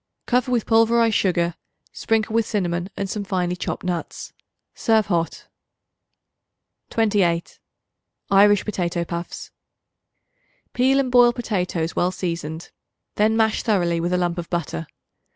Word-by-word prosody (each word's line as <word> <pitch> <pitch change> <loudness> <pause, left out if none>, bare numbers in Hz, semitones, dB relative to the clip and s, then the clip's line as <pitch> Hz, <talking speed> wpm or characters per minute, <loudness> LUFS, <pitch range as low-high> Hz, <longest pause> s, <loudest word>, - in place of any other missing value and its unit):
Cover 250 0 +1
with 240 -3 +1
pulverized 230 0 +3
sugar; 175 -4 +1 0.4
sprinkle 220 -1 0
with 230 -1 +1
cinnamon 175 -3 -2
and 200 - -2
some 205 +1 -4
finely 180 -2 -1
chopped - - -4
nuts. 180 -2 -4 0.4
Serve 220 -2 +2
hot. 170 -4 -2 1.4
28. 200 -7 0 0.7
Irish 205 0 +5
Potato 175 -4 -2
Puffs. 170 0 -6 1.2
Peel 265 +2 +3
and 260 -2 0
boil 245 -1 +6
potatoes 180 -8 -2
well 175 - +2
seasoned; 170 -3 -5 0.5
then 220 +2 +3
mash 220 -1 +2
thoroughly 175 -6 +1
with 175 +2 -1
a 180 - +2
lump 175 -1 -1
of 170 - -6
butter. 145 - -3
190 Hz, 125 wpm, -22 LUFS, 175-225 Hz, 1.4 s, boil